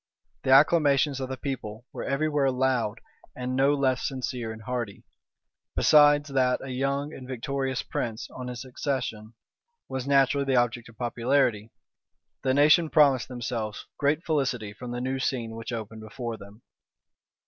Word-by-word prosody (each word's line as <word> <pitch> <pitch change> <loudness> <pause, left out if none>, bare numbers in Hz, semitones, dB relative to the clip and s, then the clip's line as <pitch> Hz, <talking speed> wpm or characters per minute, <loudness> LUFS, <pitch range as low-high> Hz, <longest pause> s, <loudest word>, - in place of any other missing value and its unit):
The - - -3
acclamations 140 0 +5
of 130 -1 -4
the 130 - -4
people 125 -5 -5
were - - -5
every 140 +3 0
where 145 -3 +2
loud, 125 -4 0 0.4
and 125 0 -3
no 135 +2 +4
less 135 -2 +1
sincere 125 -4 -4
and 110 0 -9
hearty. 120 -4 -4 0.7
Besides 145 0 +5
that 130 -2 +2
a 135 - -7
young 140 +3 -1
and 130 - -9
victorious 130 +1 -2
prince, 115 -2 -4
on 125 -1 -7
his 125 0 -6
accession, 125 -4 -4 0.5
was 130 0 -4
naturally 140 0 +3
the 135 -1 +1
object 120 -1 +1
of 115 - -18
popularity, 120 -2 +1 0.7
the 130 0 +1
nation 155 +3 +5
promised 140 -6 +4
themselves 115 -4 -4
great 150 +4 +1
felicity 130 -9 -1
from 125 +3 -8
the 120 0 -4
new 130 +1 -2
scene 120 -4 -2
which 115 +1 -6
opened 110 -1 -6
before 115 +2 -5
them. 105 +2 -14
130 Hz, 155 wpm, -27 LUFS, 120-140 Hz, 0.7 s, acclamations